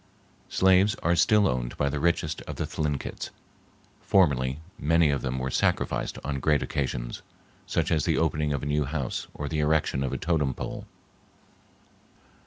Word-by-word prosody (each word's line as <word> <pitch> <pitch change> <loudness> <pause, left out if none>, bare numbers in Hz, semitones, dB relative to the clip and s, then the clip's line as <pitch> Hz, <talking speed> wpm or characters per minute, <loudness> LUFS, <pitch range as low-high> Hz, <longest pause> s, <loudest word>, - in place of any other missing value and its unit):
Slaves 95 +2 +4
are 85 +1 +3
still 100 +5 +4
owned 60 -2 -2
by 70 - +1
the 70 +1 -1
richest 80 -1 0
of - - -5
the - - -2
Thlinkits. 75 -3 -3 0.7
Formerly, 70 -7 +2 0.2
many 80 0 +3
of 70 - -1
them 65 -1 -2
were 65 +1 -2
sacrificed - - 0
on 70 -1 -2
great 75 +2 +2
occasions, 65 -3 -3 0.5
such - - 0
as 80 -4 +2
the - - +1
opening 75 -2 +1
of 70 -2 -2
a - - -2
new 75 0 +1
house 70 -3 -3
or 75 - -4
the 80 +1 -2
erection 75 -3 +1
of 65 - -2
a - - -2
totem 75 -6 0
pole. - - -6
75 Hz, 165 wpm, -27 LUFS, 70-80 Hz, 0.7 s, Slaves